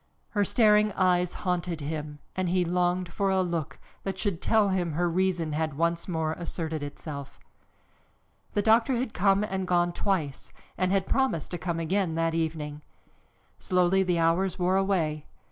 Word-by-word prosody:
Her 205 Hz, -2 st, +1 dB
staring 210 Hz, 0 st, +4 dB
eyes 180 Hz, -2 st, +2 dB
haunted 175 Hz, -2 st, -1 dB
him 150 Hz, 0 st, -5 dB, 0.2 s
and 185 Hz, -2 st, 0 dB
he 180 Hz, 0 st, +2 dB
longed 180 Hz, 0 st, 0 dB
for 200 Hz, -1 st, 0 dB
a 190 Hz, -1 st, +2 dB
look 170 Hz, -4 st, -3 dB, 0.2 s
that 195 Hz, -1 st, -4 dB
should 195 Hz, -4 st, -1 dB
tell 215 Hz, -3 st, +3 dB
him 180 Hz, -4 st, 0 dB
her 175 Hz, +3 st, +1 dB
reason 175 Hz, -2 st, 0 dB
had 155 Hz, -1 st, -2 dB
once 170 Hz, +1 st, 0 dB
more 160 Hz, -3 st, -1 dB
asserted 160 Hz, -2 st, -4 dB
itself. 145 Hz, -1 st, -7 dB, 1.1 s
The 205 Hz, -, +1 dB
doctor 230 Hz, +4 st, +4 dB
had 240 Hz, -1 st, -2 dB
come 195 Hz, +2 st, +3 dB
and 190 Hz, -3 st, -2 dB
gone 175 Hz, -1 st, +2 dB
twice 165 Hz, -10 st, -2 dB, 0.2 s
and 185 Hz, 0 st, 0 dB
had 195 Hz, -1 st, +2 dB
promised 265 Hz, -, 0 dB
to 175 Hz, -, -3 dB
come 170 Hz, -2 st, -2 dB
again 170 Hz, 0 st, 0 dB
that 165 Hz, 0 st, +1 dB
evening. 155 Hz, -2 st, -3 dB, 0.8 s
Slowly 180 Hz, +1 st, +2 dB
the 180 Hz, -2 st, +1 dB
hours 170 Hz, +3 st, +2 dB
wore 180 Hz, +1 st, +1 dB
away. 170 Hz, -6 st, 0 dB
175 Hz, 160 wpm, -27 LUFS, 165-190 Hz, 1.1 s, staring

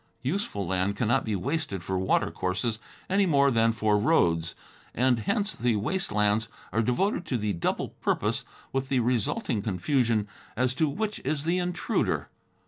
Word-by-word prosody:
Useful 135 Hz, -, -2 dB
land 95 Hz, +3 st, 0 dB
cannot 120 Hz, +4 st, +1 dB
be 110 Hz, -2 st, -1 dB
wasted 120 Hz, -, -2 dB
for 95 Hz, -, -2 dB
watercourses 95 Hz, +4 st, 0 dB, 0.3 s
any 195 Hz, +1 st, +3 dB
more 140 Hz, -3 st, +4 dB
than 115 Hz, -1 st, +3 dB
for 110 Hz, -2 st, +2 dB
roads, 90 Hz, -, +2 dB, 0.4 s
and 125 Hz, 0 st, +3 dB
hence 205 Hz, -, 0 dB
the 120 Hz, -2 st, +1 dB
waste 185 Hz, -, 0 dB
lands 105 Hz, +1 st, +2 dB, 0.2 s
are 115 Hz, -, +3 dB
devoted 175 Hz, -, +1 dB
to 125 Hz, -, 0 dB
the 105 Hz, -2 st, -1 dB
double 85 Hz, -, -1 dB
purpose, -, -, -1 dB, 0.3 s
with 135 Hz, 0 st, -1 dB
the 130 Hz, -, +2 dB
resulting 120 Hz, -, 0 dB
confusion 110 Hz, -, +1 dB, 0.3 s
as 125 Hz, 0 st, +2 dB
to 160 Hz, +1 st, +1 dB
which 210 Hz, +7 st, -2 dB
is 150 Hz, -2 st, -2 dB
the 170 Hz, +3 st, +1 dB
intruder. 180 Hz, 0 st, -1 dB
120 Hz, 155 wpm, -27 LUFS, 105-150 Hz, 0.4 s, more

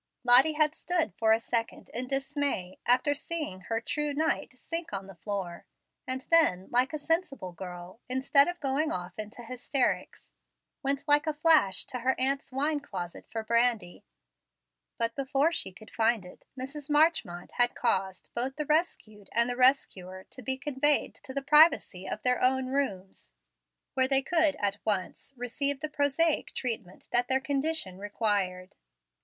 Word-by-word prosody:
Lottie 255 Hz, +5 st, +7 dB
had 305 Hz, 0 st, +2 dB
stood 340 Hz, -1 st, -1 dB
for 220 Hz, 0 st, +1 dB
a 220 Hz, -, +5 dB
second 230 Hz, 0 st, -3 dB
in 250 Hz, +2 st, -2 dB
dismay, 270 Hz, -8 st, -2 dB
after 255 Hz, +4 st, +4 dB
seeing 295 Hz, -, -5 dB
her 225 Hz, +4 st, -2 dB
"true 290 Hz, +4 st, -2 dB
knight" 300 Hz, -3 st, -1 dB
sink 330 Hz, +5 st, -5 dB
on 195 Hz, -1 st, -4 dB
the 195 Hz, -, -11 dB
floor, 180 Hz, -1 st, -6 dB, 0.4 s
and 260 Hz, 0 st, -2 dB
then, 195 Hz, -, +4 dB
like 250 Hz, +4 st, +3 dB
a 305 Hz, -, -3 dB
sensible 295 Hz, -, -2 dB
girl, 180 Hz, +2 st, -9 dB
instead 275 Hz, +2 st, +4 dB
of 350 Hz, 0 st, -4 dB
going 280 Hz, +3 st, 0 dB
off 180 Hz, +3 st, -5 dB
into 215 Hz, +3 st, -7 dB
hysterics, 250 Hz, +2 st, -2 dB, 0.5 s
went 280 Hz, +1 st, -2 dB
like 295 Hz, +1 st, +4 dB
a 310 Hz, -, -1 dB
flash 300 Hz, -, +3 dB
to 250 Hz, -, -5 dB
her 260 Hz, +2 st, 0 dB
aunt's 275 Hz, +1 st, -1 dB
wine 290 Hz, +3 st, 0 dB
closet 180 Hz, -11 st, -7 dB
for 225 Hz, -1 st, -4 dB
brandy. 230 Hz, -5 st, 0 dB, 0.9 s
But 230 Hz, 0 st, -1 dB
before 275 Hz, +3 st, +1 dB
she 260 Hz, -, -2 dB
could 215 Hz, +4 st, -15 dB
find 225 Hz, -3 st, +2 dB
it 180 Hz, -, -15 dB
Mrs. 280 Hz, +3 st, -7 dB
Marchmont 295 Hz, -, +1 dB
had 245 Hz, 0 st, +4 dB
caused 190 Hz, -5 st, -1 dB
both 255 Hz, +3 st, -3 dB
the 300 Hz, -, -3 dB
rescued 275 Hz, -, -1 dB
and 235 Hz, +1 st, +2 dB
the 245 Hz, -, -2 dB
rescuer 190 Hz, -8 st, +1 dB
to 255 Hz, -, -10 dB
be 260 Hz, +2 st, -2 dB
conveyed 290 Hz, +1 st, +2 dB
to -, -, -9 dB
the 275 Hz, +1 st, -3 dB
privacy 295 Hz, -, +4 dB
of 215 Hz, -, -5 dB
their 250 Hz, -1 st, +2 dB
own 260 Hz, +1 st, +2 dB
rooms, 200 Hz, -9 st, -3 dB, 0.6 s
where 260 Hz, -1 st, +2 dB
they 270 Hz, 0 st, +2 dB
could 320 Hz, 0 st, +3 dB
at 200 Hz, 0 st, -2 dB
once 205 Hz, +4 st, -2 dB
receive 270 Hz, +3 st, -2 dB
the 310 Hz, +1 st, -4 dB
prosaic 295 Hz, +2 st, 0 dB
treatment 225 Hz, -7 st, -4 dB
that 245 Hz, +1 st, +3 dB
their 265 Hz, +1 st, +2 dB
condition 275 Hz, -, -1 dB
required. 200 Hz, -3 st, -2 dB
255 Hz, 160 wpm, -29 LUFS, 210-290 Hz, 0.9 s, Lottie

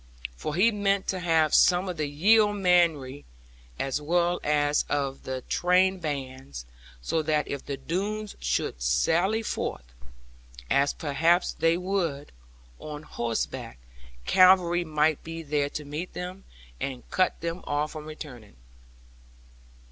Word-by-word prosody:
For 150 Hz, -, -4 dB
he 210 Hz, +6 st, +4 dB
meant 200 Hz, -2 st, 0 dB
to 190 Hz, -, -1 dB
have 165 Hz, -3 st, +2 dB
some 180 Hz, +1 st, +5 dB
of 180 Hz, -, -3 dB
the 150 Hz, -1 st, -1 dB
yeomanry 175 Hz, -5 st, +3 dB, 0.5 s
as 135 Hz, +2 st, -2 dB
well 175 Hz, +3 st, +1 dB
as 145 Hz, 0 st, +2 dB
of 140 Hz, -2 st, -2 dB
the 130 Hz, -1 st, -4 dB
trained 185 Hz, +5 st, +2 dB
bands, 130 Hz, -, -5 dB, 0.4 s
so 160 Hz, -, 0 dB
that 150 Hz, -1 st, 0 dB
if 140 Hz, -, -5 dB
the 140 Hz, -, -3 dB
Doones 205 Hz, +6 st, -3 dB
should -, -, -2 dB
sally 175 Hz, -, +2 dB
forth, -, -, -4 dB, 0.8 s
as 140 Hz, +1 st, +3 dB
perhaps 165 Hz, +4 st, +1 dB
they 165 Hz, +1 st, +2 dB
would, 175 Hz, -6 st, -2 dB, 0.5 s
on 150 Hz, 0 st, -7 dB
horseback, 115 Hz, -, -4 dB, 0.5 s
cavalry 180 Hz, -, +5 dB
might 155 Hz, -1 st, +1 dB
be 165 Hz, 0 st, -7 dB
there 145 Hz, -1 st, 0 dB
to 150 Hz, 0 st, -6 dB
meet 150 Hz, +5 st, -5 dB
them, 180 Hz, +2 st, -7 dB, 0.3 s
and 130 Hz, -3 st, -5 dB
cut 185 Hz, -1 st, +1 dB
them 170 Hz, +2 st, -3 dB
off 145 Hz, +1 st, -1 dB
from 155 Hz, -1 st, -8 dB
returning. 135 Hz, -, -10 dB
155 Hz, 130 wpm, -27 LUFS, 145-180 Hz, 0.8 s, some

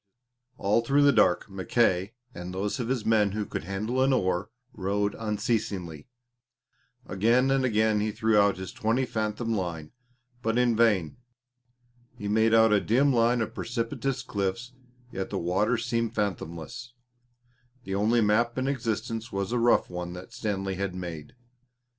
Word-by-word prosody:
All 105 Hz, +4 st, +2 dB
through 140 Hz, +5 st, +3 dB
the 145 Hz, -, +6 dB
dark, 90 Hz, -9 st, +3 dB
Mackay 95 Hz, +1 st, 0 dB, 0.2 s
and 90 Hz, +1 st, -7 dB
those 100 Hz, +6 st, -2 dB
of 120 Hz, -, -2 dB
his 125 Hz, -3 st, -1 dB
men 105 Hz, -3 st, +3 dB
who 105 Hz, 0 st, -2 dB
could 80 Hz, -, -5 dB
handle 105 Hz, +7 st, -2 dB
an 135 Hz, +1 st, +3 dB
oar 95 Hz, -3 st, 0 dB, 0.2 s
rowed 100 Hz, 0 st, -1 dB
unceasingly. 105 Hz, -7 st, -2 dB, 1.0 s
Again 120 Hz, +7 st, +2 dB
and 135 Hz, -1 st, +2 dB
again 110 Hz, -3 st, +2 dB
he 105 Hz, +1 st, 0 dB
threw 110 Hz, 0 st, +1 dB
out 100 Hz, -2 st, +4 dB
his 95 Hz, +2 st, -6 dB
twenty 125 Hz, +1 st, 0 dB
fathom 110 Hz, 0 st, -2 dB
line, 85 Hz, -6 st, -4 dB, 0.5 s
but 115 Hz, 0 st, 0 dB
in 125 Hz, -2 st, +3 dB
vain. 105 Hz, -8 st, +2 dB, 1.0 s
He 105 Hz, -, -5 dB
made 110 Hz, +2 st, +3 dB
out 110 Hz, -1 st, +5 dB
a 105 Hz, -, +4 dB
dim 135 Hz, +5 st, +3 dB
line 120 Hz, 0 st, +3 dB
of 110 Hz, -, -3 dB
precipitous 125 Hz, +3 st, -3 dB
cliffs, 105 Hz, +4 st, -3 dB, 0.4 s
yet 95 Hz, 0 st, -4 dB
the -, -, -3 dB
water 95 Hz, +8 st, +1 dB
seemed 115 Hz, 0 st, -2 dB
fathomless 90 Hz, +4 st, -4 dB, 0.9 s
the 95 Hz, -, -5 dB
only 110 Hz, +4 st, +2 dB
map 115 Hz, +3 st, +2 dB
in 130 Hz, +1 st, 0 dB
existence 115 Hz, -3 st, -3 dB
was 100 Hz, +2 st, -2 dB
a 120 Hz, -, +1 dB
rough 120 Hz, +1 st, +3 dB
one 90 Hz, 0 st, -5 dB
that 90 Hz, +1 st, -10 dB
Stanley 95 Hz, -2 st, -2 dB
had 95 Hz, -2 st, -3 dB
made. 85 Hz, -1 st, -7 dB
110 Hz, 155 wpm, -27 LUFS, 95-120 Hz, 1.0 s, the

